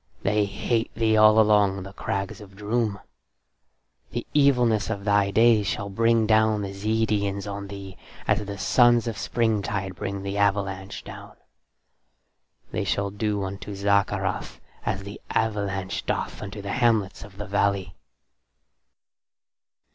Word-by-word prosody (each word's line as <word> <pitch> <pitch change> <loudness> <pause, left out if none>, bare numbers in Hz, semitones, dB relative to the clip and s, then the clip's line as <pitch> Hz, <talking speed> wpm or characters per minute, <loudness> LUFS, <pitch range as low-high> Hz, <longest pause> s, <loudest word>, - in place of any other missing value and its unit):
They 105 +1 +2
hate 110 +3 -1
thee 110 -1 +2
all 110 0 +7
along 105 -3 +3
the 95 +1 -10
crags 95 +2 -4
of 100 -1 -13
Droom. 105 0 -1 1.1
The - - -4
evilness 125 -8 +3
of 100 -3 -3
thy 100 -1 +3
days 110 0 +4
shall 100 +1 -3
bring 115 +2 +3
down 110 -1 +3
the 100 0 -5
Zeedians 105 -1 0
on 100 0 -5
thee 95 -1 -9 0.3
as 105 0 +2
the 100 0 -6
suns 120 +3 +4
of 115 -2 -3
springtide 105 -4 -1
bring 100 +2 -4
the 100 +1 -3
avalanche 100 -1 -1
down. - - -10 1.4
They - - -1
shall 100 0 -1
do 105 0 -1
unto 100 +1 -6
Zaccarath 100 0 0 0.3
as 95 0 -1
the 100 +1 -9
avalanche 100 -3 -1
doth - - -2
unto 100 0 -7
the 100 - -3
hamlets 110 -5 +1
of 100 -1 -13
the 105 - -5
valley." 100 -2 0
100 Hz, 135 wpm, -25 LUFS, 100-110 Hz, 1.4 s, all